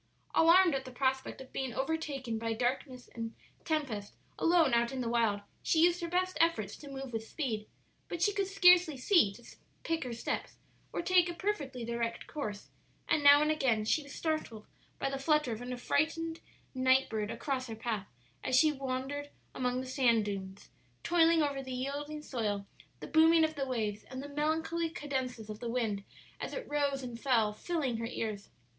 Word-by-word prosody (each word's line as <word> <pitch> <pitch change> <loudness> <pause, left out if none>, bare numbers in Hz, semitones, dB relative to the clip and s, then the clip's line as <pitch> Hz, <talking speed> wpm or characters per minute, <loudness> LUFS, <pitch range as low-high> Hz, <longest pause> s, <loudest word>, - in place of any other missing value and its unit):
Alarmed 340 +1 +6
at 270 -1 -1
the 260 - -9
prospect 265 +1 -1
of 260 - -13
being 260 -3 -3
overtaken 270 -5 -2
by 225 0 -1
darkness 250 +2 -2
and 230 -1 -6 0.3
tempest 270 -11 -2 0.2
alone 330 -6 +4
out 235 0 +3
in 265 - -4
the 245 - -2
wild, 230 -3 +1 0.2
she - - +1
used 350 0 +4
her 340 - -2
best 365 +2 0
efforts 220 -12 +1
to 290 - -11
move 270 -2 -7
with 225 0 -3
speed; 225 -9 -3 0.4
but 345 - -4
she 410 +4 +3
could 395 -1 0
scarcely 360 -6 +6
see 260 - +4
to 215 +5 -14 0.4
pick 330 0 -1
her 250 - -5
steps 235 - -3 0.4
or - - -3
take 360 -1 +4
a 345 - -5
perfectly 290 - -3
direct 235 0 -3
course, 210 -9 -5 0.4
and 300 - +2
now 285 +1 +8
and 305 - +2
again 245 -8 +1
she 305 - +2
was 285 -1 -12
startled 310 -11 -3 0.3
by - - -1
the 270 0 -3
flutter 300 -2 +2
of 225 +1 -4
an 245 +1 -5
affrighted 320 +6 0 0.3
night 260 0 +3
bird 215 -1 -2
across 255 +3 -2
her 225 - -5
path 220 -3 -3 0.4
as 260 - +1
she 310 +4 +6
wandered 275 +1 -4 0.2
among 250 0 -1
the - - -6
sand 250 -5 +2
dunes, 195 -1 -6 0.3
toiling 335 -2 +4
over 280 -2 -1
the 260 -1 -7
yielding 290 +4 -4
soil, 210 -7 -2 0.4
the - - -6
booming 325 +1 +6
of 315 0 +1
the 275 -2 -3
waves 215 -5 -2
and 260 +1 -7
the 285 - -7
melancholy 320 +3 0
cadences 260 -7 -4
of 215 -1 -7
the 240 - -4
wind 225 -5 -1 0.4
as - - -5
it - - -5
rose 285 -2 0
and 240 -2 -6
fell 230 -5 +2
filling 275 -1 -2
her 230 0 -3
ears. 215 -4 -4
265 Hz, 190 wpm, -32 LUFS, 230-315 Hz, 0.4 s, now